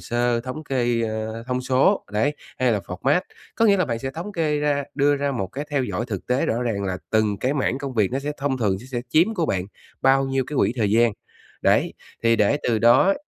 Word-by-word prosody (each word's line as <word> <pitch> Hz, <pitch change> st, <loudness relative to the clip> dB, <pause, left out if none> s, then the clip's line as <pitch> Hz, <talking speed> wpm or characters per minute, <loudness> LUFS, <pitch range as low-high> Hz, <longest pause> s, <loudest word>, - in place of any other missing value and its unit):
sơ, 120 Hz, 0 st, 0 dB
thống 130 Hz, +6 st, -6 dB
kê, 120 Hz, -4 st, 0 dB
ơ, 110 Hz, 0 st, -3 dB
thông 125 Hz, 0 st, -1 dB
số, 135 Hz, +10 st, +2 dB
đấy, 125 Hz, +8 st, +1 dB, 0.2 s
hay 125 Hz, -2 st, +3 dB
là 105 Hz, -, +1 dB
format. 100 Hz, -, 0 dB, 0.3 s
Có 230 Hz, -, +2 dB
nghĩa 205 Hz, -3 st, +5 dB
là 185 Hz, -, +2 dB
bạn 115 Hz, -6 st, -2 dB
sẽ 135 Hz, +3 st, -4 dB
thống 170 Hz, +9 st, -6 dB
kê 155 Hz, -4 st, 0 dB
ra 145 Hz, -1 st, 0 dB
đưa 145 Hz, 0 st, +3 dB
ra 140 Hz, 0 st, -1 dB
một 100 Hz, -7 st, -2 dB
cái 135 Hz, +10 st, -6 dB
theo 140 Hz, -3 st, +1 dB
dõi 105 Hz, 0 st, -3 dB
thực 100 Hz, -5 st, -5 dB
tế 125 Hz, +2 st, +1 dB
rõ 115 Hz, +2 st, 0 dB
ràng 110 Hz, -5 st, -1 dB
là 95 Hz, -1 st, -2 dB
từng 110 Hz, -2 st, +2 dB
cái 130 Hz, +6 st, 0 dB
mảng 130 Hz, -2 st, 0 dB
công 135 Hz, -2 st, -5 dB
việc 105 Hz, -1 st, +1 dB
nó 135 Hz, -, 0 dB
sẽ 145 Hz, +2 st, -3 dB
thông 140 Hz, -2 st, -1 dB
thường 100 Hz, -5 st, +1 dB
se 120 Hz, -, -12 dB
sẽ 130 Hz, -2 st, -3 dB
chiếm 175 Hz, +8 st, +3 dB
của 170 Hz, -6 st, 0 dB
bạn 90 Hz, -8 st, -1 dB, 0.4 s
bao 135 Hz, +1 st, +4 dB
nhiêu 135 Hz, -1 st, 0 dB
cái 150 Hz, -, -5 dB
quỹ -, -, +3 dB
thời 105 Hz, -4 st, +1 dB
gian. 115 Hz, +1 st, +4 dB, 0.5 s
Đấy, -, -, +2 dB, 0.3 s
thì 115 Hz, 0 st, +4 dB
để 105 Hz, +8 st, +2 dB
từ 115 Hz, -2 st, +1 dB
đó 120 Hz, -, +5 dB
125 Hz, 245 wpm, -23 LUFS, 115-145 Hz, 0.5 s, nghĩa